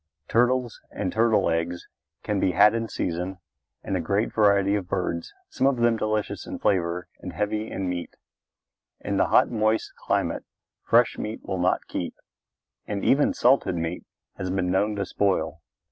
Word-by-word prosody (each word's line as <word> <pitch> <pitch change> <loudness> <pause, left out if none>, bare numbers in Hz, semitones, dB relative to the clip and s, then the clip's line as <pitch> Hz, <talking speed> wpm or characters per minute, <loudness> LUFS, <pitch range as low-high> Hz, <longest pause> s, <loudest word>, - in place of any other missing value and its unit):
Turtles 125 0 +1
and 95 -3 -3
turtle 115 0 +3
eggs 85 +1 -2 0.4
can 105 -2 -1
be 95 - +1
had 105 +5 +6
in 115 0 -1
season 90 -1 -3 0.5
and 95 - -2
a - - +1
great 100 +6 0
variety 100 -2 +4
of 100 -4 -1
birds, 90 -3 -2 0.2
some 135 - +1
of 135 -2 +2
them 120 -1 +3
delicious 110 -1 -2
in - - -5
flavor 90 -2 0
and - - -7
heavy 105 +1 -2
in 95 -1 -3
meat. 90 -1 -4 0.9
In - - -2
the - - +3
hot, - - +4
moist 110 -1 0
climate - - 0 0.4
fresh 120 +1 +3
meat 110 +1 -4
will 95 - -3
not 90 +1 +1
keep - - -4 0.7
and 100 -1 -3
even 145 +2 +4
salted 125 -7 +3
meat 85 +1 -3 0.3
has 90 - -3
been 90 -1 0
known 105 +3 +1
to 100 - -2
spoil. 95 -5 0
100 Hz, 165 wpm, -25 LUFS, 90-110 Hz, 0.9 s, had